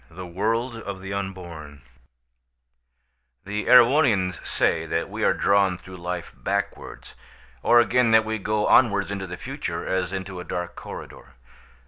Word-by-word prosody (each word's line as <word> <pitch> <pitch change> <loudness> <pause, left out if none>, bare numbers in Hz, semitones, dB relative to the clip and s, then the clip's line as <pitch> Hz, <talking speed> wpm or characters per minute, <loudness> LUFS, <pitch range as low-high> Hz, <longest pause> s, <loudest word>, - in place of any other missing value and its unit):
THE 90 +3 -9
WORLD 115 +7 -1
OF 100 -3 -6
THE 95 +1 -6
UNBORN 85 -7 -7 1.6
The 105 +2 -4
Erewhonians 120 - +5
say 80 0 0
that 80 +1 -2
we - - -4
are - - +3
drawn 100 -2 +2
through 90 +1 -12
life 90 0 -5
backwards; - - -4 0.5
or 120 +9 +5
again, 120 0 +3
that 110 0 +5
we 110 0 -2
go 105 +1 0
onwards 100 -5 +4
into 95 -1 -4
the 90 -1 -7
future - - -5
as 95 -1 -1
into 95 -1 -5
a - - -6
dark 90 0 -5
corridor. - - -10
95 Hz, 145 wpm, -24 LUFS, 90-110 Hz, 1.6 s, Erewhonians